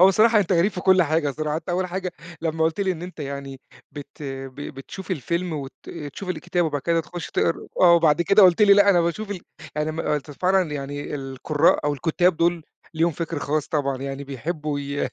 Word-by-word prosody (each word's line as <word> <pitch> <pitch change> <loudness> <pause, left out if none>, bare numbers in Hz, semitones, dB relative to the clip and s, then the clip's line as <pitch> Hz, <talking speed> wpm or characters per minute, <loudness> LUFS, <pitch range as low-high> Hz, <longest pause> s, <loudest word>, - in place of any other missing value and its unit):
هو 185 - +9
بصراحة 215 +3 +5
أنت 190 0 0
غريب 180 +4 +3
في 180 - -5
كل 185 0 +5
حاجة 155 -2 +1
صراحة، 150 +2 -2
أنت 165 - -7
أول 180 +1 0
حاجة 185 0 -4 0.3
لمّا 160 0 0
قُلت 160 +4 0
لي 190 -2 +1
إن 170 - -8
أنت 180 -3 -8
يعني 140 -1 -6 0.3
بت 145 +1 -10
ب 135 -2 -6
بتشوف 145 +7 -8
الفيلم 170 +2 -2
وت 140 -3 -5 0.4
تشوف 195 - -8
الكتابة 175 0 -1
وبعد 145 -2 -3
كده 170 -1 +2
تخُش 170 +1 -7
تقرا 165 - 0
آه، 175 -2 +7
وبعد 165 -1 +4
كده 195 +4 +5
قُلت 185 +2 +6
لي 200 - +7
لأ 200 0 +6
أنا 175 - +4
باشوف 170 +5 -2
ال 190 -4 -4 0.4
أنا 150 +1 0
ما 160 -1 -2
قُلت 150 0 -4
فعلًا 180 +2 +1
يعني 145 +1 -5
القُرّاء 145 +3 +1
أو 145 - +2
الكُتّاب 175 +4 +1
دول 170 0 +1 0.3
ليهم 165 +2 +2
فِكْر 165 +1 -4
خاص 150 +1 -1
طبعًا، 140 -4 0
يعني 135 0 -5
بيحبّوا 150 +2 -4
ي 140 0 -2
160 Hz, 210 wpm, -23 LUFS, 145-180 Hz, 0.4 s, هو